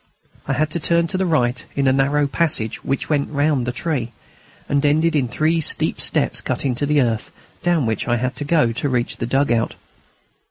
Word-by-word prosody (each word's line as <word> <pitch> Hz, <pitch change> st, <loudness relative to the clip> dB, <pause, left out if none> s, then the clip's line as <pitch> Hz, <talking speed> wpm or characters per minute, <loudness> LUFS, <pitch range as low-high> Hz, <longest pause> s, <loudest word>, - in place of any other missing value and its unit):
I -, -, 0 dB
had 155 Hz, +1 st, 0 dB
to 170 Hz, -, -2 dB
turn 170 Hz, +1 st, +2 dB
to 190 Hz, -, -2 dB
the 190 Hz, -, +1 dB
right 125 Hz, -7 st, +1 dB
in 140 Hz, -1 st, +1 dB
a 130 Hz, -, +4 dB
narrow 140 Hz, +2 st, +2 dB
passage 140 Hz, -7 st, -1 dB
which 135 Hz, -, -2 dB
went 145 Hz, -2 st, 0 dB
round 145 Hz, -4 st, 0 dB
the -, -, 0 dB
tree, 120 Hz, -3 st, -3 dB, 0.5 s
and 140 Hz, 0 st, +1 dB
ended 155 Hz, +3 st, +2 dB
in 135 Hz, -4 st, +1 dB
three 160 Hz, +6 st, +1 dB
steep -, -, +2 dB
steps -, -, +1 dB
cut -, -, -3 dB
in 130 Hz, -, +1 dB
the 145 Hz, +4 st, +1 dB
earth, 115 Hz, -3 st, -1 dB, 0.3 s
down 175 Hz, -6 st, +1 dB
which 110 Hz, -2 st, -2 dB
I 120 Hz, -, +2 dB
had 130 Hz, +2 st, -2 dB
to -, -, -3 dB
go 145 Hz, -6 st, +2 dB
to 140 Hz, +5 st, -2 dB
reach 125 Hz, -2 st, -1 dB
the 115 Hz, -, -3 dB
dug 135 Hz, +2 st, +1 dB
out. 115 Hz, -1 st, 0 dB
140 Hz, 210 wpm, -20 LUFS, 120-155 Hz, 0.5 s, a